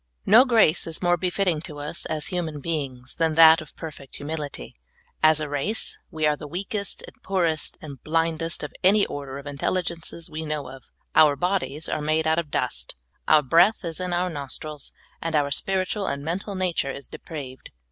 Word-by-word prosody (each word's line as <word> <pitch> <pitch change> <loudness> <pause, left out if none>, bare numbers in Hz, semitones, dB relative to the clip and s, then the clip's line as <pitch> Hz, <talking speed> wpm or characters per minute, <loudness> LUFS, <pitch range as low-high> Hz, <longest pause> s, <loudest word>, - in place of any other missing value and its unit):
* - - -45
NO 230 +6 +8
grace 220 - +4
is 165 +2 -4
more 175 0 +4
befitting 180 -2 0
to 155 -2 -9
us 150 +3 -3
as 155 -1 -2
human 165 -5 -3
beings 135 -5 -4
than 160 -2 +1
that 160 0 +8
of 155 - -13
perfect 150 -4 -9
humility. 145 - -6 0.5
As 155 0 +5
a 155 - -2
race, 145 +10 +2
we 155 -1 -1
are 150 0 +3
the 150 - -9
weakest, 200 +5 -4
and - - -16
poorest, 170 -5 0
and 140 -4 -9
blindest 165 +1 0
of - - -6
any 200 +2 +5
order 140 -2 -6
of 140 - -9
intelligences, 165 +3 -2
we 155 +1 -5
know 150 -3 -3
of. 135 0 -11 0.3
Our 150 -2 +6
bodies 175 -3 -1
are 155 - -2
made 155 +1 +1
out 160 +1 +3
of 165 -3 -4
dust, 65 - -2 0.3
our 155 -1 +6
breath 175 - +4
is 165 0 -4
in 180 -1 -2
our 180 +1 0
nostrils, 145 0 -5 0.3
and 165 -1 -2
our 145 -1 +2
spiritual 190 +6 -1
and 140 +1 -3
mental 190 +5 -3
nature 180 -7 0
is 140 0 -7
depraved. 135 -5 -8
160 Hz, 190 wpm, -25 LUFS, 145-175 Hz, 0.5 s, NO